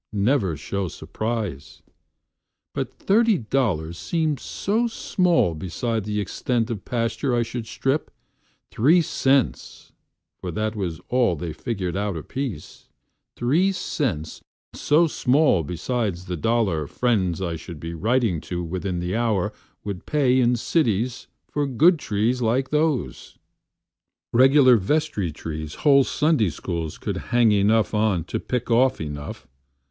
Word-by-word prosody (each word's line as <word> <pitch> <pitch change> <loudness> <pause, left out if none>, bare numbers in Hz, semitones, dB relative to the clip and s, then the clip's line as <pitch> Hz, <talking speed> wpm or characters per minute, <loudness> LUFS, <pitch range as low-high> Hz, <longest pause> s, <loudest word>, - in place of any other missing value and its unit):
Never 100 - +1
show 95 +5 -3
surprise! 105 - -5 0.9
But - - -3
thirty 220 +1 +3
dollars 100 - -1
seemed 160 -5 -1
so 220 - -1
small 180 - +1
besideThe 105 +5 -2
extent 115 +3 -1
of 105 -4 -5
pasture 120 +2 -1
I 120 - +2
should 115 0 -6
strip, 135 +6 -1 0.6
three 160 +10 +4
cents(For 135 - -2
that 110 +4 -2
was 90 -6 -4
all 120 -8 +2
they 80 0 -5
figured 95 -6 -3
out 100 -3 -2
apiece),Three 130 - -3
cents 105 - -3 0.3
so 155 +3 +3
small 140 - +3
beside 95 - -2
the 90 +1 -6
dollar 95 -5 0
friendsI 95 - 0
should 85 -1 -9
be 85 +2 -6
writing 110 -1 +1
to 90 -1 -4
within 90 +1 -3
the 90 +1 -3
hourWould 100 -3 -3
pay 130 -4 +3
in 125 0 +3
cities 120 - 0 0.2
for 145 -1 -1
good 155 +7 +4
trees 115 +2 0
like 125 +4 +1
those, 150 -3 -1 1.0
Regular 130 0 +6
vestry 105 - 0
trees 80 0 -6
whole 140 -2 +7
Sunday 150 - +2
SchoolsCould 80 +1 -4
hang 120 -2 +4
enough 105 +2 +3
on 105 -5 +1
to 85 - -4
pick 125 -1 -3
off 125 +3 +3
enough. 75 -2 -6
115 Hz, 120 wpm, -23 LUFS, 90-130 Hz, 1.0 s, whole